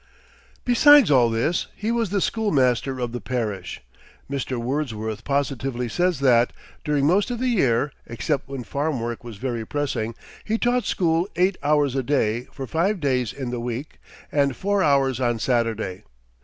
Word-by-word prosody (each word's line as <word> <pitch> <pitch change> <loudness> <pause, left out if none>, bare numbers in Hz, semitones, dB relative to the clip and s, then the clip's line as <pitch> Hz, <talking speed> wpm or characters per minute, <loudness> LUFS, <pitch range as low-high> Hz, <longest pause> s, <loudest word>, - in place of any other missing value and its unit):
Besides 265 - +7
all 125 -4 +5
this, 115 +10 0
he 215 +2 -2
was 230 -3 0
the 200 +1 0
schoolmaster 135 - +1
of 120 -1 -2
the 120 -1 -5
parish. 105 -4 -3 0.5
Mr. 135 -2 -3
Wordsworth 115 -4 -3
positively 135 -3 -1
says 175 +3 0
that, 120 -3 +4 0.3
during 145 -2 +1
most 190 - +3
of 245 - -2
the 255 +2 0
year, 140 - +2 0.2
except 135 +4 -2
when 135 -2 -5
farm 140 +2 -2
work 115 +1 -4
was 115 -4 -9
very 120 0 -3
pressing, 115 -4 -2 0.3
he 220 +1 -1
taught 245 +1 +1
school 170 +1 +1
eight 185 +1 +2
hours 145 -2 +2
a 135 - +1
day 120 -3 0
for 135 - -6
five 175 - 0
days 130 -6 0
in 130 -3 -5
the 125 - -3
week, 120 +4 -5 0.3
and 140 -3 +2
four 200 +5 0
hours 135 -5 +2
on 120 -2 +1
Saturday. 115 -5 -1
135 Hz, 165 wpm, -23 LUFS, 120-165 Hz, 0.5 s, Besides